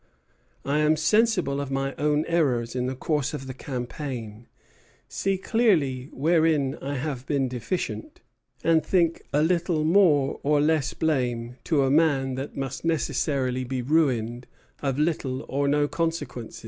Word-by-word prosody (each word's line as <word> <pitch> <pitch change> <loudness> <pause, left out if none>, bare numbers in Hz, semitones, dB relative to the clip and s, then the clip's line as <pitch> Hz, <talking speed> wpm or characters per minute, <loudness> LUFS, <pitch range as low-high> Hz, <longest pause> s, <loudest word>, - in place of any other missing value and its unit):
I 145 +2 +1
am 150 +1 +4
sensible 180 -4 +2
of 140 - -5
my 135 0 -1
own 150 +1 +1
errors 130 -9 0
in 125 0 -1
the 130 - -3
course 150 +1 -1
of 135 -2 -7
the 130 - -6
campaign, 125 -4 -6 0.6
see 195 -1 -1
clearly 160 - +1
wherein 155 -2 +2
I 140 +1 -3
have 135 -2 -4
been 140 -3 +1
deficient, 175 - -4 0.4
and 165 -2 +3
think 170 0 +1
a 150 +1 +2
little 170 -1 +1
more 155 -5 +3
or 150 +1 +2
less 150 -2 +1
blame 125 -6 -1
to 150 -4 +2
a 135 - +2
man 140 -4 +3
that 135 +2 -6
must 135 -1 -4
necessarily 135 -5 0
be 125 0 -3
ruined, 125 -5 +1 0.3
of 135 -2 -1
little 150 -4 -1
or 140 +1 0
no 145 +1 +2
consequence. 165 -8 -3
145 Hz, 150 wpm, -25 LUFS, 130-160 Hz, 0.6 s, am